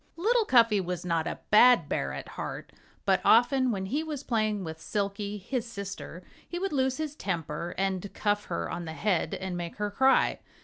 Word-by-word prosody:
Little 450 +6 +2
Cuffy 230 - +5
was 180 0 -4
not 165 -1 0
a - - -3
bad 245 +4 +7
bear - - -1
at - - -7
heart. - - -6 0.3
But - - +3
often 255 +2 +5
when 195 -4 -2
he 285 +10 -1
was 300 -3 -5
playing 215 -5 0
with 160 -1 -7
Silkie, 200 +1 -2
his 235 +5 -3
sister, 200 -4 -7 0.3
he 350 - -4
would 385 -1 -2
lose 265 -1 +1
his 310 -2 -4
temper 170 - -4
and 195 0 -1
cuff 205 -1 0
her 85 0 -3
on 175 - -5
the 160 - -6
head 180 -3 0
and 190 -1 -4
make 175 -1 -5
her 210 0 -2
cry. 265 +5 +3
205 Hz, 190 wpm, -28 LUFS, 180-255 Hz, 0.3 s, bad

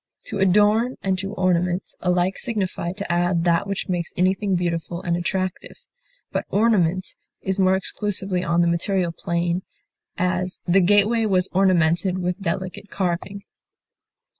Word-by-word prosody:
To 200 - -3
adorn 210 +6 +3
and 190 -1 0
to 195 +1 -4
ornament 180 0 0
alike 180 +1 +1
signify 195 -7 -2
to 200 -2 -5
add 175 0 +1
that 170 +2 +2
which 200 -1 -3
makes 175 -3 -2
anything 190 +2 +1
beautiful 170 -1 -2
and 170 -1 0
attractive, 185 +1 -3 0.5
but - - -2
ornament 190 -4 +2 0.3
is 190 +1 -1
more 190 0 +4
exclusively 190 -1 -2
on 170 0 +2
the 170 - +3
material 175 +1 0
plane; 170 +2 -1 0.6
as, 180 0 -1
the 185 +2 +5
gateway 205 +4 +3
was 185 -2 +1
ornamented 180 -1 +3
with 180 +1 -2
delicate 185 +2 -4
carving. 190 +1 -3
185 Hz, 140 wpm, -23 LUFS, 175-195 Hz, 0.6 s, the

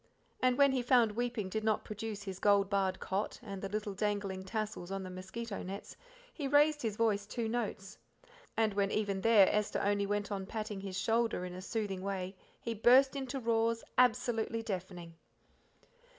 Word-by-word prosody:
And 255 -1 +3
when 280 -1 +6
he 260 -1 +1
found 240 -2 +4
weeping 235 -2 -2
did 220 +3 -3
not 215 -1 +1
produce 215 -1 -5
his 190 -2 -6
gold 200 -1 +3
barred 190 -1 +1
cot, 195 +2 -2
and 200 -4 -6
the 195 - -4
little 210 0 -3
dangling 200 -2 -2
tassels 215 -3 -4
on 195 0 -3
the 185 - -7
mosquito 200 +4 -6
nets, 195 +2 -7 0.4
he 290 -4 -3
raised 295 +2 +4
his 220 -3 -2
voice 210 -3 +1
two 230 +1 -2
notes, 215 -3 -3 0.6
and 220 -2 +2
when 200 0 +1
even 200 -2 -1
there 215 -3 +6
Esther 210 0 0
only 200 0 +1
went 205 0 -1
on 195 -1 -3
patting 215 -2 -4
his 190 -1 -5
shoulder 225 -1 +1
in 180 - -6
a 185 - -7
soothing 200 -2 -3
way 190 -1 -3 0.2
he 230 - -3
burst 255 +5 +5
into 270 0 -3
roars 230 -1 +1
absolutely 235 -2 +2
deafening. 180 -4 -5
210 Hz, 180 wpm, -33 LUFS, 195-230 Hz, 0.6 s, when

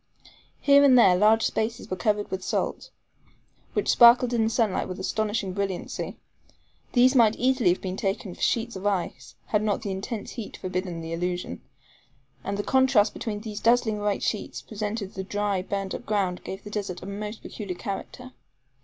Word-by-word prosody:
Here 280 0 +6
and 265 -3 +7
there 190 -7 +7
large 215 +4 +4
spaces 225 +1 -1
were - - 0
covered 205 +2 0
with 190 0 -3
salt, - - -2 0.8
which - - -1
sparkled 240 +1 +6
in 230 -2 +2
the 220 - +2
sunlight 225 -4 0
with 185 0 -6
astonishing 205 0 -1
brilliancy. 195 -2 -4 0.8
These 255 +1 +5
might 230 -4 +5
easily 255 -5 +2
have 175 - +1
been 185 0 -3
taken 195 -1 -2
for - - -14
sheets 235 -1 0
of 190 +2 -3
ice, 170 -11 -3
had 210 - +2
not 215 0 -1
the 200 - -3
intense 200 +3 -5
heat 230 -4 -7
forbidden 185 -2 -4
the 165 0 -5
illusion; 180 +1 -3 0.8
and 200 0 -3
the 205 - -2
contrast 260 -5 +3
these 210 -1 -5
dazzling 230 -2 +2
white 205 -1 -1
sheets - - -3
presented 210 -2 -4
to - - -23
the 190 - -2
dry, 205 -1 -1
burned 195 0 -3
up - - -7
ground 195 -4 0
gave 190 +1 -7
the 210 - -9
desert 195 -4 -4
a - - -7
most 210 +2 -6
peculiar 200 -5 -6
character. 250 +7 -6
205 Hz, 180 wpm, -26 LUFS, 190-225 Hz, 0.8 s, and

